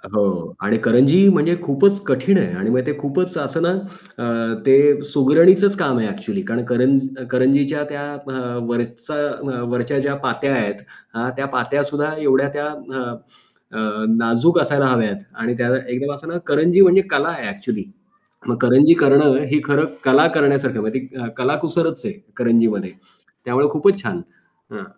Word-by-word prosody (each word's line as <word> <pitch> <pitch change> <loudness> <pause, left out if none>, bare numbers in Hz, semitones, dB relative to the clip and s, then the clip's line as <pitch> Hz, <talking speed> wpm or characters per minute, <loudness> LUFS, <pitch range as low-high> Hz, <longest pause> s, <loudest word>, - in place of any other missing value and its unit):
हो. 95 -5 -1
आणि - - 0
करंजी 140 +11 +5
म्हणजे 170 0 +1
खूपच 195 +7 +2
कठीण 145 +9 +2
आहे. 185 +1 -1
आणि 180 - -3
मग 125 +2 +2
ते 150 - 0
खूपच 165 +5 -2
असं 150 +3 -3
ना 170 - +2 0.5
अ, 115 -1 -2
ते 145 +2 +5
सुगरणीचंच 175 +8 +5
काम 140 -9 0
आहे 110 - -1
एक्चुअली, 205 -1 -5
कारण 120 +1 -3
कर 125 0 0 0.5
करंजीच्या 140 +3 +1
त्या 145 -1 -6 0.2
व 135 - -6 0.4
वरचा 120 +4 -5 0.2
अ, 130 -3 -6
वरच्या 125 +3 -1
ज्या 140 0 -2
पात्या 140 -1 -1
आहेत, 100 -4 -3 0.3
हां. 120 +2 -3
त्या 135 - -2
पात्या 140 +4 0
सुद्धा 145 +1 -3
एवढ्या 140 0 +2
त्या 145 0 -4
अ, 150 -3 -7 0.8
अ, 110 0 -3
नाजूक 115 +10 +2
असायला 140 -2 +1
हव्यात 110 -6 0 0.2
आणि 120 +2 -1
त्या 120 -1 -1 0.2
एकदम 140 +3 -3
असं 145 +3 -11
ना 175 - -4
करंजी 170 +6 +3
म्हणजे 190 +1 +7
कला 140 +4 +1
आहे 170 - -5
एक्चुअली. 200 +2 -5 0.6
मग 120 - 0
करंजी 135 +6 +6
करणं 140 -1 +5
ही 150 - +3
खरं 145 +2 +2 0.2
कला 135 +4 +5
करण्यासारख 140 -3 +2
आहे 110 - -3
म्हणजे 110 +5 -2
ती 130 -2 -9
कलाकुसरच 160 +5 -1
आहे 210 - -4 0.2
करंजीमध्ये 115 -5 +1 0.5
त्यामुळे 130 +4 +1
खूपच 195 +6 +2
छान. 175 -1 -4 0.5
हं. - - -9
140 Hz, 165 wpm, -19 LUFS, 120-155 Hz, 0.8 s, म्हणजे